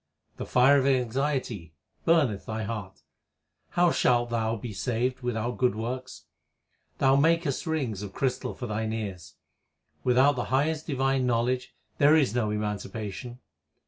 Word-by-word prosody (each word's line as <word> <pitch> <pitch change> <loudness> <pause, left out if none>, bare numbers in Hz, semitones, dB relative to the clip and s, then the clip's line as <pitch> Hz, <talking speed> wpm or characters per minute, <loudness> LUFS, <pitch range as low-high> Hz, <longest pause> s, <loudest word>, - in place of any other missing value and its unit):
The - - -5
fire 135 +3 +5
of 135 - +1
anxiety 125 - -1 0.3
burneth 145 -12 +2
thy 110 0 -3
heart 105 -4 -6 0.7
How 175 -1 +5
shalt 120 -4 +2
thou 115 -1 0
be 110 0 -6
saved 125 +4 -1
without 120 0 -2
good 125 -4 +2
works? 125 +4 -5 0.7
Thou 135 0 +4
makest 165 +1 +2
rings 130 -11 -2
of 100 -2 -6
crystal 130 +3 -2
for 125 - -6
thine 110 0 -2
ears. 95 -9 -6 0.7
Without 130 +3 +4
the 120 - -1
highest 150 +4 0
divine 135 -2 +1
knowledge 125 +2 0 0.2
there 145 +2 +6
is 140 -9 +3
no 120 -3 0
emanci 105 -2 -3
pation. 115 +3 -6
125 Hz, 145 wpm, -27 LUFS, 110-135 Hz, 0.7 s, there